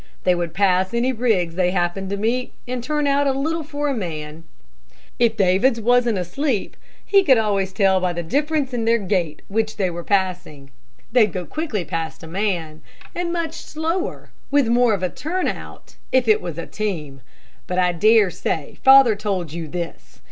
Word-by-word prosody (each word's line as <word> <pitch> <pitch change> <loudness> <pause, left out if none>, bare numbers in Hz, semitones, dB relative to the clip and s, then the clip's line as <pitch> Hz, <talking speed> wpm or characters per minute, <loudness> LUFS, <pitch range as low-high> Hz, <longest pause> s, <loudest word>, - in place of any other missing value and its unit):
They 180 - +4
would 170 -2 -3
pass 190 +1 +2
any 245 +2 +2
rigs 215 -8 +1
they 180 0 +1
happened 180 +1 -1
to 200 - -2
meet, 235 +5 -1
and 250 -1 -3
turn 295 +2 -1
out 280 0 +2
a 270 - +2
little 315 +5 -1
for 295 -1 -3
a 280 - 0
man. 160 - -6 0.7
If 230 -2 +2
Davids 200 +6 +3
wasn't 240 -1 +2
asleep, 210 - -2 0.3
he 395 -1 +4
could 265 -8 +5
always 200 -3 0
tell 190 -1 +3
by 180 -1 +1
the 170 0 -4
difference 290 - -1
in 230 -2 -1
their 230 +1 +4
gait 180 -7 -2
which 215 +1 -1
they 190 -3 0
were 170 0 -6
passing. 180 -8 -2 0.4
They'd 220 -5 +4
go 180 0 -4
quickly 270 - -3
past 165 +1 -4
a - - -8
man, 170 -4 -2 0.3
and 350 -1 -2
much 335 -2 -2
slower, 330 +4 -4 0.2
with 285 -3 +3
more 240 -2 +4
of 190 - -6
a 185 - +1
turn 355 +4 -2
out, - - -7
if 260 -2 +3
it 215 - +4
was 170 -3 -6
a 170 - -4
team. 155 -11 -4 0.5
But 180 - -3
I 180 -1 +3
dare 210 +2 +4
say 160 -3 -4
father 265 -4 +7
told 190 -6 -3
you 165 -1 -5
this. 165 - -7
205 Hz, 185 wpm, -21 LUFS, 175-255 Hz, 0.7 s, father